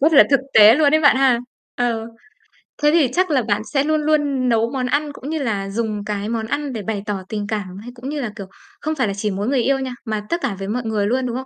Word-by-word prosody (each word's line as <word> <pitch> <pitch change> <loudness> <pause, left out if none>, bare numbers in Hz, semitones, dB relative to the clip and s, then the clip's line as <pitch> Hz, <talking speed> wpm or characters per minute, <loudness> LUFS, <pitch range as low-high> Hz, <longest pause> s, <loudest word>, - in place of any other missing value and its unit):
rất 310 +4 +3
là 285 - +8
thực 275 -2 +4
tế 215 +1 +9
luôn 295 0 +3
ấy 310 - +4
bạn 285 -4 +5
ha. 260 -3 +4 0.4
Ờ, 230 -2 -1 0.8
thế 295 - +6
thì 315 -4 +4
chắc 370 0 +2
là 280 -4 +2
bạn 210 -1 0
sẽ 275 -1 +3
luôn 310 +1 +1
luôn 290 -4 +1
nấu 230 0 +2
món 260 -2 -2
ăn 290 +3 0
cũng 280 - -8
như 315 0 -2
là 205 -7 -2
dùng 215 -1 -3
cái 210 0 -3
món 225 -1 -2
ăn 285 +2 -3
để 220 - -4
bày 205 -1 -4
tỏ 200 -3 -3
tình 210 -2 -3
cảm, 200 -4 -4
hay 245 - -9
cũng 250 +3 -7
như 295 0 -3
là, 235 -5 -3
kiểu, 200 - -7 0.4
không 310 +1 -2
phải 255 -6 0
là 200 - -2
chỉ 205 +1 -2
mỗi 200 +3 -3
người 265 -1 +2
yêu 275 0 +2
nha, 260 -1 -4
mà 215 -2 -2
tất 340 +1 -1
cả 250 -8 -2
với 195 - -5
mọi 240 +4 -2
người 210 -2 0
luôn, 255 +3 0
đúng 240 -1 -3
không? 260 +1 -4
245 Hz, 285 wpm, -20 LUFS, 215-285 Hz, 0.8 s, tế